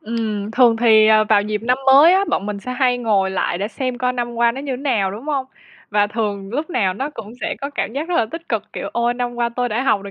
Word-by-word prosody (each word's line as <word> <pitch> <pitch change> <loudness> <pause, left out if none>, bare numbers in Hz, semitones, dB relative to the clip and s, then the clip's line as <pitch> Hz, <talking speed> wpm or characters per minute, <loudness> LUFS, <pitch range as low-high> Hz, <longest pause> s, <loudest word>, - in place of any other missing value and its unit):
Ừm, 215 -2 -3
thường 235 -1 +4
thì, 220 -2 +5
ờ, 215 0 +5
vào 210 -1 +3
dịp 210 0 -3
năm 250 +2 +1
mới 280 +6 +7
á, 390 - +3
bọn 200 - -1
mình 205 -1 -4
sẽ 250 - -5
hay 250 -1 +1
ngồi 205 -5 +1
lại 185 -2 -1
để 200 +2 -2
xem 255 0 -4
coi 250 0 0
năm 240 -1 -4
qua 235 0 +2
nó 265 - -6
như 280 -1 -4
thế - - -2
nào, 245 -8 0
đúng 210 +6 -8
hông? 280 -3 -1 0.4
Và 205 -1 +2
thường 205 -2 -3
lúc 300 +8 -3
nào 195 - 0
nó 275 +7 -4
cũng 225 -6 -9
sẽ - - -2
có 280 - -4
cảm 285 - -3
giác 290 +6 -4
rất 355 - -1
là 230 - +2
tích 330 +3 -8
cực, - - -1
kiểu: - - -5
"Ôi, 235 +1 0
năm 245 0 -3
qua 240 0 0
tôi 245 +1 -2
đã 235 +2 -1
học 210 -7 +1
được 200 - -8
235 Hz, 285 wpm, -19 LUFS, 210-255 Hz, 0.4 s, mới